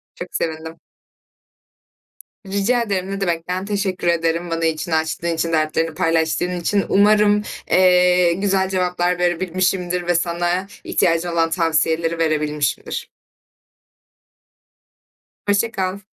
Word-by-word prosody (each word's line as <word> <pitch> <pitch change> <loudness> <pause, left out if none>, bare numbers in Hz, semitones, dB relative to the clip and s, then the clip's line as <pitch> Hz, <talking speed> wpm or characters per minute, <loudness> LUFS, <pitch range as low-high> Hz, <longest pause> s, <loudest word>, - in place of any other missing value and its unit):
Çok - - -7
sevindim. 160 0 -4 1.7
Rica 200 +5 +1
ederim, 195 -4 -2
ne 195 0 -4
demek. 170 -3 -2
Ben 185 +1 -2
teşekkür 200 -3 -2
ederim 170 0 0
bana 165 0 -1
içini 160 +1 -1
açtığın 160 +1 -1
için, 165 +1 -2
dertlerini 160 +1 0
paylaştığın 165 +1 0
için. 200 +3 +1
Umarım, 210 +1 +4 0.3
eee, 180 -1 +4
güzel 190 +1 0
cevaplar 180 -1 0
verebilmişimdir 180 0 0
ve 175 - +2
sana 175 +2 0 0.2
ihtiyacın 165 0 +1
olan 165 -1 +1
tavsiyeleri 165 0 +1
verebilmişimdir. 150 -3 -1 2.4
Hoşça 205 +3 +2
kal. 190 0 -2
175 Hz, 110 wpm, -20 LUFS, 165-190 Hz, 2.4 s, Umarım